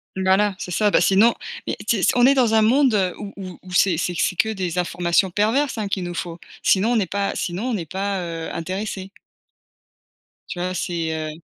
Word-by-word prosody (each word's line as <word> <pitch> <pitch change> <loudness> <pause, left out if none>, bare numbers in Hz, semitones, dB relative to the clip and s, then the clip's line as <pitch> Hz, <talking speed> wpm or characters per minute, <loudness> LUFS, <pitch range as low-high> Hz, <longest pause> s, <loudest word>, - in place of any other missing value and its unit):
Voilà 190 +2 +2
c'est - - -6
ça 210 +2 +2
bah - - +4
sinon 210 +5 +5 0.3
mais - - -2
si 210 -5 +1
c - - +4
on 245 0 +5
est 275 - +5
dans 240 -4 +3
un 220 - +5
monde 220 -6 +3
où 200 -1 -8
où 185 -2 -8
où 185 - -12
c'est 180 -2 +3
c'est 175 +2 -1
c'est 180 - 0
que 220 - +1
des 185 -5 -3
informations 175 +1 +1
perverses 225 +7 +1
hein 210 - -2
qu'il 190 -2 -2
nous 175 - -5
faut, 170 0 -5 0.2
sinon 205 +5 +3
on 230 - +3
est 190 - -1
pas 200 0 0
sinon 180 +4 -3
on 235 - 0
est 165 -5 -7
pas, 195 0 -2
heu, 165 -2 -5
intéressé. 190 +3 -4 1.4
Tu 175 - -6
vois 180 +1 -2
c'est, 165 -2 -2
heu 155 -1 -4
190 Hz, 215 wpm, -22 LUFS, 175-215 Hz, 1.4 s, sinon